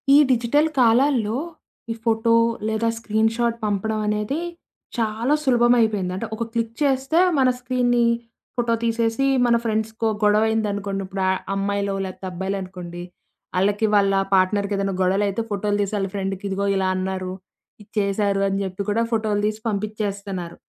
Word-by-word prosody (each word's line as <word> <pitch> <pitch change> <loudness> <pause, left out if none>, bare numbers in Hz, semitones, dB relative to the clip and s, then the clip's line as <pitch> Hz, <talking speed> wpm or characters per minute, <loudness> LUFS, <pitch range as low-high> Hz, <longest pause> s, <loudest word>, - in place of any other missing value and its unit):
ఈ - - +9
డిజిటల్ 255 +5 +3
కాలాల్లో 240 -2 +3 0.5
ఈ - - 0
ఫోటో 230 0 +2 0.3
లేదా 220 +1 0
స్క్రీన్ 220 0 +1
షాట్ 235 -1 0
పంపడం 215 +2 -1
అనేది 210 +6 -1 0.6
చాలా 225 +4 0
సులభం 240 -3 +4
అయిపోయింది. 205 -5 +1
అంటే 225 +4 -4
ఒక 230 - -2
క్లిక్ 230 -1 -1
చేస్తే 270 +3 +2 0.2
మన 260 -1 +5
స్క్రీన్‌ని 245 -1 +1 0.5
ఫోటో 235 -1 +1
తీసేసి 230 +3 +1 0.2
మన 235 -1 +4
ఫ్రెండ్స్‌కో 220 0 -1 0.2
గొడవదనుకోండి 210 -2 +1
ఇప్పుడు 190 0 -3
అ - - +4 0.2
అమ్మాయిలో 200 0 -1
లేపోతే 190 0 -7
అబ్బాయిలనుకోండి, 185 -2 -5 0.5
ఆళ్ళకి 205 +3 +2
వాళ్ళ 200 -1 +4 0.2
పార్ట్‌నర్‌కి 200 +2 +2
ఏద‌న్నా 195 -1 -1
గొడవలైతే 200 +3 +1
ఫోటోలు 205 +1 0
తీసి 200 +1 -2
వాళ్ళ 195 -1 -1
ఫ్రెండ్‌కి 195 -1 -3
ఇదిగో 200 +1 -1
ఇలా 190 -1 +1
అన్నారు. 185 0 -3 0.5
ఇది 205 - -17
చేశారు 200 0 +1
అని 195 0 -1
జేప్పి 190 +1 -4
కూడా 225 +3 +1
ఫోటోలు 215 -2 0
తీసి 215 0 -3
పంపిచేస్తన్నారు. 200 -4 -4
210 Hz, 140 wpm, -22 LUFS, 195-230 Hz, 0.6 s, ఈ